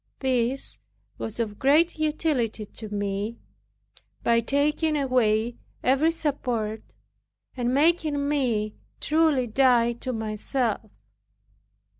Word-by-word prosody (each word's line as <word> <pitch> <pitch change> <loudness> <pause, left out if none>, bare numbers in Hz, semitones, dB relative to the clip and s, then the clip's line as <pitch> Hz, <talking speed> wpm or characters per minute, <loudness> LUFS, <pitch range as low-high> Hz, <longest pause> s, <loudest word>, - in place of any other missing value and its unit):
This 260 0 -1 0.4
was 225 +1 -5
of 210 -3 -2
great 310 +5 +3
utility 295 -8 0
to 215 +1 -9
me, 205 +2 -2 0.9
by 235 0 +4
taking 295 +5 +1
away 240 -4 +1 0.3
every 275 +5 +4
support, 250 -9 -2 0.7
and 245 -2 0
making 295 0 +2
me 235 -8 0 0.3
truly 305 -4 +2
die 240 0 +3
to 255 +2 -5
myself. 220 0 -2
250 Hz, 95 wpm, -26 LUFS, 220-290 Hz, 0.9 s, by